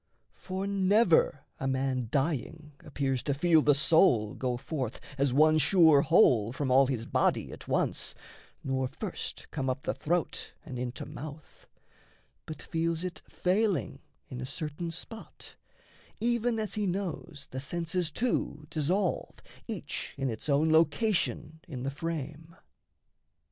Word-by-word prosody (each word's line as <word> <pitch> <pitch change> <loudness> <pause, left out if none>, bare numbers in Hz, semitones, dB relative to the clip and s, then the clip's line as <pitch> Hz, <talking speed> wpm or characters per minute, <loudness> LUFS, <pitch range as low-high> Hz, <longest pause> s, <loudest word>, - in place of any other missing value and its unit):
For 190 0 -5
never 195 -6 +3
a 135 - -2
man 130 -2 0
Dying 150 +3 -2
appears 135 -3 -2
to 140 - -1
feel 160 +1 +4
the 145 -1 +4
soul 135 - +4
go 125 -2 -2
forth 130 -3 -4 0.2
As 140 -1 +1
one 155 +4 +5
sure 160 -2 +6
whole 125 - +4
from 130 +1 -2
all 135 +1 +6
his 120 -4 -2
body - - +1
at - - -10
once, - - 0 0.5
Nor 130 -1 0
first 170 - -6
come 135 -3 -2
up 130 +2 -2
the - - -1
throat 170 0 -2
and 125 -2 -6
into 125 0 -4
mouth; 150 +1 -10 0.8
But 155 -2 -7
feels 165 +1 -1
it 180 -1 -5
failing 185 - 0 0.3
in 125 -1 -7
a - - -3
certain 155 +3 -4
spot, 200 +7 -8 0.7
Even 235 0 +1
as 215 -2 -2
he 210 -2 0
knows 175 -5 -4
the 130 - -4
senses 170 +4 -2
too 155 -6 -1
dissolve 175 +6 0 0.3
Each - - -4
in 135 -2 -1
its 110 +7 -6
own 150 +3 +3
location 160 0 +1
in 130 -6 -6
the 135 - -2
frame. 160 +1 -5
155 Hz, 140 wpm, -30 LUFS, 135-175 Hz, 0.8 s, sure